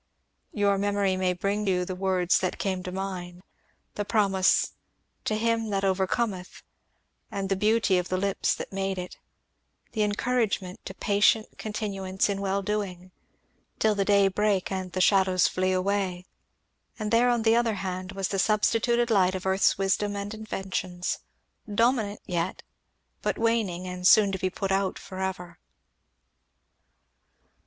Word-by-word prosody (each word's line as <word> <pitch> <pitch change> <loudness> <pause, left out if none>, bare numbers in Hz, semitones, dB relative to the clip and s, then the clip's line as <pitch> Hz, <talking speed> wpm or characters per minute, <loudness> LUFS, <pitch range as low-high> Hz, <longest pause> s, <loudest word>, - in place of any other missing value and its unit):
Your 200 -2 +1
memory 200 -1 +1
may 185 -1 +1
bring 200 +4 -1
to - - +3
you 180 -1 0
the 185 - -4
words 185 -1 +1
that 185 - -2
came 190 -2 -2
to 180 - -6
mine, 180 -2 -5 0.5
the 205 - -2
promise 200 -3 +2 0.5
'to 215 - 0
him 225 0 0
that 195 -1 -1
overcometh', 190 0 -1 0.7
and 195 -1 -3
the 195 - +2
beauty 210 -1 +2
of 180 - -4
the 185 - 0
lips 195 +1 0
that - - -7
made 195 0 -2
it 180 0 -7 0.7
the 220 - -2
encouragement 210 -3 -1
to 190 - -7
'patient 205 +2 +2
continuance 200 -3 -2
in 200 0 -2
well 195 0 -1
doing', 185 -3 -3 0.7
'till 220 -1 +3
the 200 -1 0
day 200 0 +4
break 200 -1 0
and 185 -2 -4
the 185 - 0
shadows 185 -1 +4
flee 185 0 0
away.' 185 -1 -1 0.7
And 215 -1 -3
there 235 +2 +4
on 240 -2 +1
the 225 0 +4
other 235 -2 +2
hand 185 -1 -4
was 195 -1 -2
the 195 - -1
substituted 230 +3 +2
light 190 -3 +3
of 185 - -5
earth's 190 +1 +3
wisdom 200 +1 0
and 200 +1 -4
inventions, 190 -4 -3 0.5
dominant 225 -1 +1
yet, 175 -1 -2 0.6
but - - -1
waning 220 -6 0
and 180 0 -1
soon 205 -1 +6
to 190 - -3
be 185 - 0
put 195 +1 -3
out 195 0 0
for 185 -1 -9
ever." 180 -3 -4
195 Hz, 155 wpm, -27 LUFS, 185-210 Hz, 0.7 s, soon